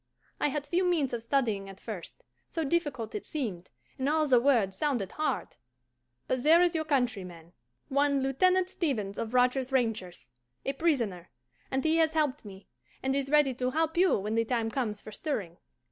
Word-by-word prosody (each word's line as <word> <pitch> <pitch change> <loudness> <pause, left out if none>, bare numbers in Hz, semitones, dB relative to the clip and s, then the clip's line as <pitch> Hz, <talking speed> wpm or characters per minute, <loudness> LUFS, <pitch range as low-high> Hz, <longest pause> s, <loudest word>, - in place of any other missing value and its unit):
I - - +2
had 290 0 -2
few 355 +4 +1
means 330 -8 +1
of 235 - -2
studying 225 -6 0
at 195 - -11
first, 205 -7 -8 0.3
so 325 - -2
difficult 285 -7 -1
it 420 - -4
seemed, 210 - -4 0.3
and 265 +2 +1
all 310 0 +2
the 255 -3 +5
words 235 -7 +2
sounded 245 -10 -1
hard; 300 - -2 0.7
but 255 - 0
there 320 +5 +6
is 355 0 +3
your 315 -1 -1
countryman, 195 - -2 0.3
one 280 0 +2
Lieutenant 365 +8 +3
Stevens 215 - -2
of 230 +2 -3
Rogers' 250 +1 +2
Rangers, 220 - -1 0.4
a 275 - 0
prisoner, 235 - 0 0.4
and 265 0 -1
he 320 0 +3
has 320 -1 +3
helped 295 -3 0
me, 195 -1 -11 0.4
and 265 +1 +1
is 275 -1 -1
ready 295 -2 +4
to 250 +1 -1
help 320 +4 0
you 365 +2 +4
when 210 +2 -3
the 230 0 +2
time 230 -1 -1
comes 220 -6 -2
for 215 - -10
stirring. 210 - -3
265 Hz, 180 wpm, -29 LUFS, 215-305 Hz, 0.7 s, there